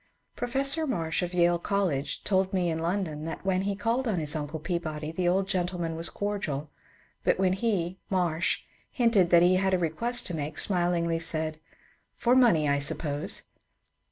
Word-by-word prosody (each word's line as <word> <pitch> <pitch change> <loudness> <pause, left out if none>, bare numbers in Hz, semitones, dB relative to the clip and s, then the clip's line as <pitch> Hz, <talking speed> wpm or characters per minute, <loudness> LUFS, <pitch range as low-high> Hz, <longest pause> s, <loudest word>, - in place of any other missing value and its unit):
Professor 275 +6 0
Marsh 165 - -1
of 175 -1 -2
Yale 175 -1 +3
College 180 -8 -1
told 190 -1 +1
me 180 -3 +1
in 160 - -2
London 165 -3 -2
that 165 - -6
when 190 -1 +1
he 200 +1 -1
called 235 +5 0
on 210 -5 0
his 150 0 +1
uncle 155 +1 -4
Peabody 155 -2 -3
the 175 +2 -1
old 190 +2 +2
gentleman 175 -3 -1
was 165 +1 -2
cordial, 175 -9 -3 0.5
but - - +2
when 185 -1 +2
he 190 -4 -1
(Marsh) 175 -2 0 0.3
hinted 230 -8 +3
that 170 -1 +6
he 185 +1 +5
had 190 0 +2
a - - +2
request 230 +9 +1
to 175 - -4
make, 150 -1 -4
smilingly 175 -3 +1
said, 155 -1 -2 0.3
" - - -38
For 240 - +2
money, 230 -13 +5
I 140 0 +2
suppose." 145 +1 -1
175 Hz, 175 wpm, -28 LUFS, 160-195 Hz, 0.5 s, that